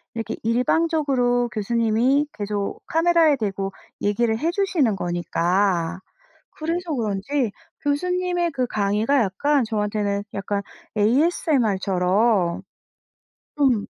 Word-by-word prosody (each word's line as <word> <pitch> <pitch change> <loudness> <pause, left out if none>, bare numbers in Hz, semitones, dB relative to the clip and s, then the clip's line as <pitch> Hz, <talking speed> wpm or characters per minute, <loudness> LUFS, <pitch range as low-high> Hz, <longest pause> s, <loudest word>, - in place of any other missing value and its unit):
이렇게 225 -1 -3
일방적으로 250 0 +1
교수님이 230 +6 +2
계속 205 -1 -3
카메라에 330 -2 +4
대고 195 -4 -3 0.3
얘기를 220 +2 +1
해 325 +3 0
주시는 345 - +1
거니까 175 0 0 0.5
그래서 335 +2 -3
그런지 225 +3 -1 0.3
교수님의 355 +3 0
그 255 -3 -1
강의가 215 +6 +1
약간 265 +8 +1
저한테는 210 -2 -1
약간 200 +1 -2 0.4
ASMR처럼. 210 - +2 0.9
좀 260 -8 +2
230 Hz, 255 characters per minute, -23 LUFS, 200-290 Hz, 0.9 s, 카메라에